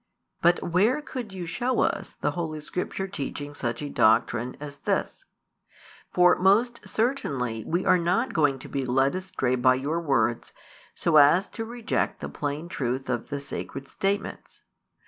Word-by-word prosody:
But 175 +1 +3
where 205 - +2
could 255 -7 -6
you 185 -2 -5
show 240 +10 0
us - - -1
the - - +1
Holy 160 -3 -4
Scripture 180 +4 -3
teaching 145 -4 -5
such 120 -1 -3
a 145 - -4
doctrine 115 +2 +2
as 145 -1 -8
this? - - -2 0.9
For 180 0 +5
most 225 +6 +3
certainly 135 - -1
we 175 +3 0
are 185 - +5
not 180 +9 +1
|271 - - -9
going 145 -4 +2
to 130 - -10
be 135 -1 -2
led 135 +2 +2
astray 180 -9 -1
by 130 +1 +4
your 145 +6 -1
words 120 -7 0 0.4
so 165 -2 +3
as 150 +7 +6
to 225 - -5
reject 235 +1 -2
the - - -5
plain 145 +3 -4
truth 130 -5 -2
of 120 -2 -3
the 145 -1 -3
Sacred 140 -1 -6
statements. 200 +1 -3
155 Hz, 165 wpm, -26 LUFS, 135-190 Hz, 0.9 s, as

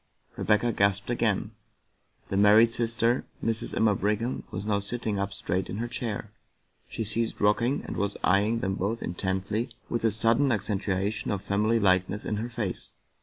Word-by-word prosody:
Rebecca 110 +3 +2
gasped 100 +1 +1
again. 110 -3 0 0.8
The - - -2
married 105 +3 +6
sister, 115 +1 +1 0.2
Mrs. 115 -1 -1
Emma 110 -2 +3
Brigham, 105 +5 -1
was 95 +3 -5
now 105 -1 +1
sitting 105 0 -2
up 100 0 -1
straight 95 -1 -2
in 100 - -4
her 120 +2 -2
chair; 110 -3 -4 0.6
she - - -3
had - - -5
ceased 115 +1 -1
rocking, 115 +7 +2
and - - -5
was 100 0 -1
eyeing 105 +5 +3
them 95 0 0
both 100 +5 -2
intently 95 +6 -2 0.2
with 120 - -2
a 115 - +4
sudden 115 +6 +3
accentuation 100 -1 -1
of 100 -1 -2
family 105 +3 +2
likeness 95 +1 +2
in 105 - -1
her 115 +3 -3
face. 110 -6 -4
105 Hz, 170 wpm, -27 LUFS, 100-115 Hz, 0.8 s, married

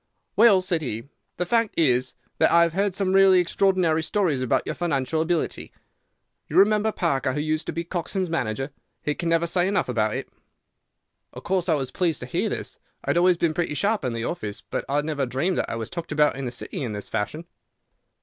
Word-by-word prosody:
"'Well,' 205 -4 +6
said 175 -3 0
he, 115 -2 -5 0.3
'the 180 - -1
fact 230 +3 +1
is 130 -5 +2 0.2
that - - +5
I 170 0 +6
have 170 -1 0
heard 195 0 0
some 190 -1 0
really 195 -1 +6
extraordinary 180 -2 +2
stories 160 -5 0
about 130 - +1
your - - -2
financial 155 -2 -1
ability. 165 0 -2 0.8
You 150 - -7
remember 210 +2 +4
Parker, 140 -9 0
who 150 - -2
used 155 +1 -1
to - - -1
be 170 - -3
Coxon's 180 +2 -3
manager? 135 -4 -2 0.3
He 150 - 0
can 170 +2 -3
never 165 0 +2
say 175 +1 +1
enough 200 0 +1
about 110 -3 0
it.' - - -5 1.0
"Of - - -9
course 185 -1 0
I 160 - +4
was 135 -3 -3
pleased 170 -5 0
to - - -4
hear - - -1
this. - - -5 0.3
I - - +1
had - - +1
always 180 0 +4
been 165 -2 +1
pretty 165 -3 -1
sharp 205 +3 0
in 125 -2 -1
the 115 0 -3
office, 110 -12 -4
but - - -4
I 140 - 0
had 145 0 +1
never 145 -4 -1
dreamed 140 +9 0
that - - -1
I - - -3
was 115 +4 -5
talked 170 -2 -6
about 150 -1 +3
in 135 0 -5
the 120 - -3
City 125 - -6
in 120 -5 -3
this 105 -1 -6
fashion. 110 +10 -3
165 Hz, 220 wpm, -24 LUFS, 135-185 Hz, 1.0 s, Well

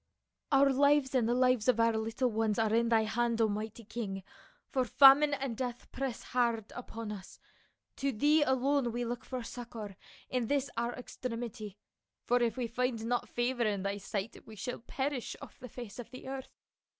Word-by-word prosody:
" - - -56
Our 275 0 +5
lives 285 0 +4
and 240 -3 +2
the 240 - +2
lives 255 -3 +3
of 245 -3 +4
our 230 0 +4
little 225 +3 0
ones 220 -1 +1
are 220 -1 +2
in 230 +1 +3
thy 225 -1 +4
hand, 235 +1 0
O 225 - +5
mighty 215 +2 -4
king, 200 -3 -5 0.4
for 260 - +1
famine 280 +5 +7
and 265 -4 -3
death 245 0 -5
press 265 -2 -3
hard 235 -3 0
upon 230 -3 -6
us. 195 -3 -9 0.6
To 275 0 0
thee 295 +7 +4
alone 265 -2 +2
we 240 0 -1
look 240 +1 -4
for 255 -2 -5
succor 225 -4 -7 0.3
in 250 -3 -1
this 280 +1 0
our 235 +1 -1
extremity, 230 -5 -6 0.5
for 245 0 +3
if 235 +1 +1
we 250 - 0
find 235 -1 -1
not 245 +1 -1
favor 240 +1 -1
in 205 -3 0
thy 200 +1 -2
sight 200 +2 -4
we 220 - -10
shall 245 +5 -4
perish 265 +1 -3
off - - -12
the 250 - -9
face 240 -1 -8
of 245 - -7
the 255 0 -10
earth. 265 -1 -5
240 Hz, 190 wpm, -32 LUFS, 220-260 Hz, 0.6 s, famine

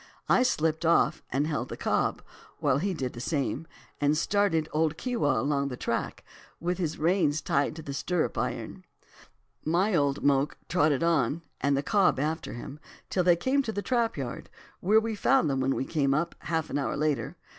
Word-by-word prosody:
I - - +4
slipped 160 -9 +1
off, 170 +1 +3
and 140 +3 0
held 155 -2 -2
the - - -6
cob, - - 0 0.3
while 140 -2 +2
he 195 +4 0
did 130 -5 -3
the 120 - -8
same, 150 +3 -2 0.3
and 145 +1 +2
started 170 -4 +1
old 155 0 +1
Keewah 235 - 0
along 140 +2 0
the 125 -2 -5
track, - - -3 0.4
with 175 +2 -2
the 160 -4 -2
reins 160 -2 +2
tied 140 0 0
to 160 - -8
the 140 - -5
stirrup 175 +4 -1
iron. - - -4 0.8
My 180 +7 +1
old 145 -4 +1
moke 140 0 +2
trotted 155 -4 +2
on, 165 -1 +1 0.2
and 140 +1 +2
the 140 - -1
cob 200 -9 +3
after 155 +3 -2
him, 135 +5 -8 0.3
till 180 - +2
they 175 -1 +5
came 260 +11 +1
to 235 -5 -3
the 205 -1 -3
trap 235 -5 0
yard, 130 -4 -5 0.3
where 210 +4 +4
we 225 0 -2
found 215 - +3
them 135 - 0
when 135 +1 +1
we 135 - -2
came 140 -3 +1
up, 170 +3 -1
half 160 -2 -2
an - - 0
hour 140 - -1
after. 150 -1 -1
155 Hz, 190 wpm, -28 LUFS, 140-180 Hz, 0.8 s, they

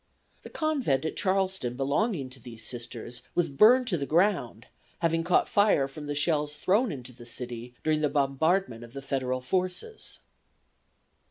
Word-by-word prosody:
The - - -10
Convent 265 - 0
at 160 - -2
Charleston 190 -10 0
belonging 140 - 0
to 130 - -11
these 115 -2 -9
Sisters 120 0 -6
was 175 - +2
burned 225 - +6
to 175 -6 +1
the 140 - -3
ground, 165 - +1 0.3
having 165 -1 +1
caught 175 +2 +3
fire 205 -9 +3
from 145 +2 -9
the 145 - -2
shells 150 0 +1
thrown 200 - +2
into 125 -3 -7
the 120 0 -13
city 120 0 -7
during 155 -1 +2
the 150 - +2
bombardment 140 -1 +1
of 120 0 -12
the 140 - -7
Federal 130 -2 -1
forces. 185 - -2
145 Hz, 160 wpm, -28 LUFS, 125-185 Hz, 0.3 s, burned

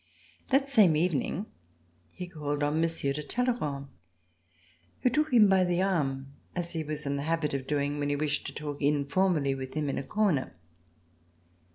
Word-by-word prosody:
That 275 0 +3
same 215 - +5
evening 170 +3 0 0.7
he 180 - -7
called 145 -4 -3
on 150 +2 +1
Monsieur 165 -4 0
de 150 - -4
Talleyrand, 150 - -2 1.1
who 250 - +3
took 305 +3 +1
him 225 -4 +7
by 190 -1 +4
the 180 +1 +1
arm, 135 -8 -1 0.2
as 175 -1 -2
he 160 -1 -2
was 150 0 -3
in 140 0 -1
the - - -2
habit 165 -3 0
of 135 -1 -3
doing 145 0 -1
when 145 0 -1
he 145 - +1
wished 150 0 -1
to - - -7
talk 145 -1 -5
Informally 145 +1 +2
with 130 +1 -6
him 150 -2 -1
In - - -1
a - - -4
corner. 185 - 0
150 Hz, 175 wpm, -29 LUFS, 140-185 Hz, 1.1 s, him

